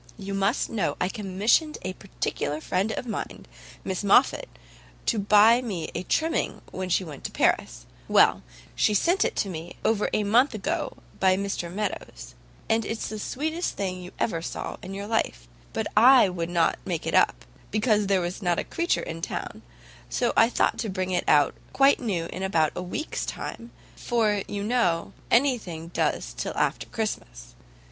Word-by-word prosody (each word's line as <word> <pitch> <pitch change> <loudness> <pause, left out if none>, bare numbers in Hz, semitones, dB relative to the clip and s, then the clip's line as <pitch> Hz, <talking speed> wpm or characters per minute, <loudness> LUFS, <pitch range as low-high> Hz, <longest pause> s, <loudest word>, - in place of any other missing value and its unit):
You 200 -1 -6
must 195 +5 +1
know 180 -10 -1
I 180 - +1
commissioned 210 - +1
a 185 +1 -3
particular 155 -5 -3
friend 185 +6 -1
of - - -4
mine, 230 - -5 0.4
Miss 190 +1 -3
Moffat, 250 - +4 0.6
to 225 - +1
buy 210 +4 +6
me 195 -10 -4
a 170 - -2
trimming 320 - -1
when 185 0 -4
she 180 +2 +2
went 150 -5 -9
to - - -3
Paris; - - 0 0.2
well, - - +5 0.3
she 210 - +2
sent 350 - +3
it - - 0
me 175 -2 -7
over 215 -2 +2
about - - -2
a 210 - 0
month 240 +5 +3
ago 305 - -2 0.2
by 185 -1 +4
Mr 195 -3 -3
Meadows, 185 - -5 0.3
and 225 0 +2
it's 225 +1 -4
the 215 - -5
sweetest 315 +10 -2
thing 185 -2 -3
you 180 - -8
ever 165 -7 -1
saw - - -5
in 190 +2 -7
your 200 +1 -5
life; 205 - -1 0.2
but - - -2
I 245 -1 +7
would 170 -2 -3
not 170 - +2
make - - -3
it - - -2
up, - - +3 0.2
because 210 -1 +2
there 195 -2 +2
was 175 +3 -4
not 175 -3 +1
a - - 0
creature 340 +1 -1
in 165 0 -6
town, - - -5 0.5
so - - 0
I 225 - +6
thought - - +1
to 225 - -2
bring 185 -1 -2
it 180 - 0
out 145 -2 +5 0.2
quite 275 +1 +5
new 195 -9 -1
in 185 - -5
about 165 -6 +2
a - - -3
week's 185 - -4
time, 235 - -6 0.3
for 215 -4 +1
you 200 -1 -4
know 205 -8 +1 0.2
any 255 +1 +4
thing 165 -4 -8
does - - -1
till - - -4
after - - 0
Christmas. - - -5
200 Hz, 180 wpm, -26 LUFS, 175-225 Hz, 0.6 s, I